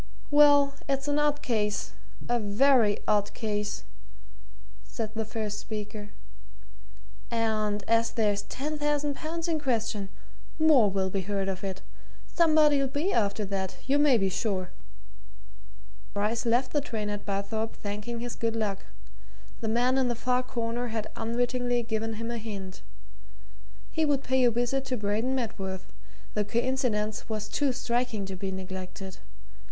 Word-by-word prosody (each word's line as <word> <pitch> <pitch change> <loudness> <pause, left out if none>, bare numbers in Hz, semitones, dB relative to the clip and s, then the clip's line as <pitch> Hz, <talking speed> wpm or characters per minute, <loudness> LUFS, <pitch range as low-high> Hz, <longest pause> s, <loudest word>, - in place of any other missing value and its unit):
"Well 290 -1 +7 0.2
it's 275 +1 0
an 290 0 +2
odd 295 0 +1
case 210 -4 0 0.4
a 240 0 +2
very 220 +1 +4
odd 205 -1 +2
case," 210 -2 -2 1.0
said 220 -3 -4
the 220 -1 -2
first 215 -1 -3
speaker. 210 -1 -6 1.2
"And 215 -3 0
as 230 0 +3
there's 210 -3 +1
ten 295 +8 -4
thousand 295 -1 +1
pounds 330 +3 -3
in 325 -2 +1
question, 225 -7 -1 0.5
more 305 -9 +6
will 190 -1 0
be 195 - 0
heard 195 +1 -1
of 190 -1 -3
it. 190 -1 -4 0.4
Somebody'll 305 -4 +4
be 295 +8 0
after 210 -1 +1
that, 190 -1 -3
you 280 +2 +3
may 290 -4 +6
be 195 -3 +2
sure!" 185 -2 -1 1.4
Bryce 220 +4 0
left 240 +3 +2
the 295 - +3
train 220 -6 -3
at 205 0 -4
Barthorpe 205 +3 -2
thanking 210 +3 -4
his 245 0 -3
good 230 -1 -1
luck 205 -3 -2 0.7
the 225 - -3
man 250 +4 +3
in 260 - +3
the 240 - 0
far 250 +2 +1
corner 240 -1 -2
had 220 -2 -3
unwittingly 245 +1 0
given 225 -1 -2
him 230 +2 -4
a 235 - -3
hint. 200 -4 -6 1.1
He 320 - +1
would 285 -2 +1
pay 260 0 +2
a - - +6
visit 245 +3 0
to 255 -1 -1
Braden 215 +5 0
Medworth 190 -6 -4 0.4
the 210 - +1
coincidence 230 -2 0
was 215 -1 -2
too 285 +3 +1
striking 245 -4 -1
to 190 0 -5
be 190 +1 -3
neglected. 190 0 -6
225 Hz, 145 wpm, -28 LUFS, 205-260 Hz, 1.4 s, Well